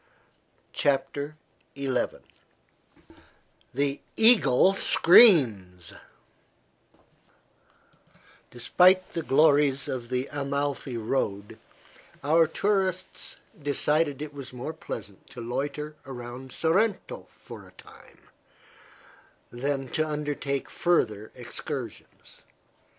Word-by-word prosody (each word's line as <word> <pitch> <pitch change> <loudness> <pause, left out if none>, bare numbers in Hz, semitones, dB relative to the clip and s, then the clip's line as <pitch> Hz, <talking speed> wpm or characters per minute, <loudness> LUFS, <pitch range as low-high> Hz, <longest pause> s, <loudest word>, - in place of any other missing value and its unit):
CHAPTER 145 +1 -1 0.4
XI 140 -1 -2 1.8
THE 140 +2 -1 0.2
EAGLE 195 - +5
SCREAMS 125 - +5 2.6
Despite 185 +10 +3
the 165 - -2
glories 140 -2 +3
of 120 -2 -5
the 125 +1 -2
Amalfi 140 -2 -3
road 105 -3 -3 0.6
our 160 +3 +4
tourists 190 -2 -2 0.2
decided 145 0 0
it 150 -1 -8
was 140 -3 -9
more 125 +5 -6
pleasant 105 - -9
to 125 - -11
loiter 145 +5 -4
around 125 0 -8
Sorrento 195 - -1
for - - -13
a - - -17
time - - -18 1.3
than 135 +2 -3
to 155 - -1
undertake 145 -2 -3
further 110 -12 0
excursions. - - -8
140 Hz, 80 wpm, -26 LUFS, 125-160 Hz, 2.6 s, EAGLE